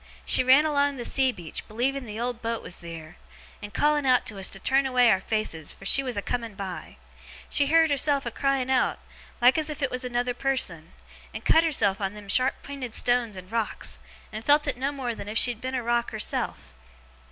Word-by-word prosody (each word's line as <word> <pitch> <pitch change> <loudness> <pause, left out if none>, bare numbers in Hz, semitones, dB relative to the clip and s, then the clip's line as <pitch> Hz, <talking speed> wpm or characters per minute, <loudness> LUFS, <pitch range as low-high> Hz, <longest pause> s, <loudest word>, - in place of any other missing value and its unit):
She - - +4
ran 265 +4 +6
along 285 -2 +1
the 240 - -5
sea 265 -1 +2
beach, 175 -8 -6
believing 255 +4 -1
the 215 0 -7
old 240 0 -3
boat 230 0 -3
was - - -5
theer; 165 -1 -10 0.4
and 205 -1 -7
calling 295 +5 +2
out 255 -2 +3
to 205 -3 -5
us 190 - 0
to 195 - -3
turn 270 +5 +2
away 250 -2 +4
our 190 -1 +2
faces, 190 -8 -2
for 195 - -15
she 275 - +2
was 250 -5 -3
a 200 - -2
coming 230 -4 -3
by. 190 -2 -7 0.5
She 285 - +3
heerd 325 +1 +4
herself 280 0 +1
a 235 - -3
crying 270 0 0
out, 260 - +2 0.4
like 250 +5 +6
as 310 0 -2
if 300 -1 -5
it 275 - 0
was 255 0 -3
another 245 0 -1
person; 215 -12 -2 0.4
and - - -7
cut 325 - +5
herself 215 -12 +2
on 195 +1 -2
them 205 -1 -11
sharp 255 +5 +2
pinted 265 -5 -6
stones 240 -4 +1
and 185 +2 -10
rocks, 230 -2 -2 0.3
and 215 +1 -5
felt 295 +3 +4
it 285 -3 -1
no 265 +3 -2
more 260 -4 -3
than 205 - -8
if 215 +1 -3
she 245 - +5
had 230 - -10
been 260 +1 -3
rock 240 0 0
herself. 210 - -3
245 Hz, 220 wpm, -26 LUFS, 210-275 Hz, 0.5 s, ran